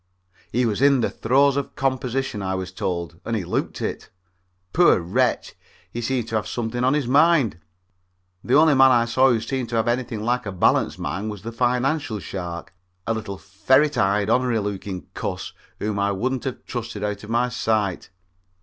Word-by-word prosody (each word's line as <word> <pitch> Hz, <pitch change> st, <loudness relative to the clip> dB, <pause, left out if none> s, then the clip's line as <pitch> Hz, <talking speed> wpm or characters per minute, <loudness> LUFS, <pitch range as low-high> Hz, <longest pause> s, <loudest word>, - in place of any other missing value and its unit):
He 125 Hz, +2 st, +1 dB
was 110 Hz, 0 st, -1 dB
in 140 Hz, -2 st, +5 dB
the -, -, 0 dB
throes 135 Hz, +4 st, +3 dB
of 140 Hz, -1 st, -3 dB
composition, 130 Hz, -3 st, -1 dB
I 95 Hz, -1 st, -2 dB
was 95 Hz, 0 st, -4 dB
told, 85 Hz, -3 st, -4 dB
and 115 Hz, -, -2 dB
he 105 Hz, -, -2 dB
looked -, -, -2 dB
it. -, -, -4 dB, 0.6 s
Poor 175 Hz, +1 st, +5 dB
wretch, 85 Hz, +1 st, 0 dB, 0.4 s
he 120 Hz, -, -4 dB
seemed 120 Hz, -1 st, -1 dB
to 110 Hz, -, -3 dB
have 105 Hz, -2 st, -3 dB
something 120 Hz, +2 st, -3 dB
on 130 Hz, +3 st, +3 dB
his 150 Hz, -3 st, 0 dB
mind. 140 Hz, -, +4 dB, 0.8 s
The 125 Hz, -, +2 dB
only 155 Hz, +1 st, +6 dB
man 135 Hz, -1 st, +7 dB
I 120 Hz, -2 st, +4 dB
saw 130 Hz, +3 st, +3 dB
who 120 Hz, -3 st, +2 dB
seemed 125 Hz, +1 st, -3 dB
to 120 Hz, -, -3 dB
have 115 Hz, +1 st, +1 dB
anything 120 Hz, -2 st, -1 dB
like 125 Hz, 0 st, 0 dB
a -, -, -3 dB
balanced 95 Hz, -, +2 dB
mind 105 Hz, +3 st, -3 dB
was 105 Hz, -2 st, -7 dB
the 115 Hz, -, -5 dB
financial 125 Hz, +1 st, 0 dB
shark, 90 Hz, -2 st, -6 dB, 0.3 s
a 115 Hz, -, 0 dB
little 105 Hz, -3 st, -5 dB
ferret 130 Hz, +11 st, +2 dB
eyed, 100 Hz, +1 st, +2 dB
onery 125 Hz, 0 st, +2 dB
looking 100 Hz, -2 st, -5 dB
cuss -, -, -4 dB, 0.2 s
whom 105 Hz, -1 st, -2 dB
I 100 Hz, 0 st, +1 dB
wouldn't 130 Hz, +6 st, -2 dB
have 130 Hz, -, -5 dB
trusted 115 Hz, -4 st, -5 dB
out 105 Hz, -1 st, -3 dB
of 105 Hz, -, -10 dB
my 120 Hz, +2 st, +1 dB
sight. 110 Hz, -6 st, -1 dB
115 Hz, 185 wpm, -23 LUFS, 100-130 Hz, 0.8 s, man